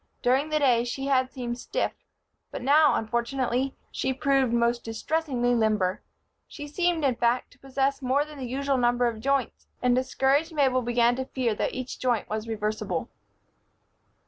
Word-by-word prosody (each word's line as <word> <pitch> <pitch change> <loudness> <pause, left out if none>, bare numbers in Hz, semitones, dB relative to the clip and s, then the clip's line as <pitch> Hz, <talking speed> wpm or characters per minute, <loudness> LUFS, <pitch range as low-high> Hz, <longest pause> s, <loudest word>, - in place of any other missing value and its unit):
During 265 +5 +2
the 310 - +1
day 250 -5 +3
she 255 +3 -4
had 260 -2 +2
seemed 240 -1 -5
stiff; - - -1 0.6
but - - -6
now, 295 +3 +5
unfortunately, 245 +3 -1 0.2
she 265 - -1
proved 270 -2 +2
most 235 0 +1
distressingly 245 +1 -1
limber. 215 -5 +1 0.5
She 290 -1 -8
seemed, 340 0 0
in 265 - +3
fact, 240 +1 0
to 250 - -22
possess 270 +1 -1
more 270 +3 +1
than 300 -2 -11
the 255 - -4
usual 275 +1 0
number 245 0 +2
of 230 -2 -1
joints, 275 +2 -1
and 250 -1 +2
discouraged 270 +5 +1
Mabel 265 -3 +3
began 240 0 +2
to 260 - -2
fear 250 -4 -1
that - - -2
each 255 0 -5
joint 245 -4 0
was 215 +1 -4
reversible. 215 -5 -2
255 Hz, 165 wpm, -26 LUFS, 235-275 Hz, 0.6 s, now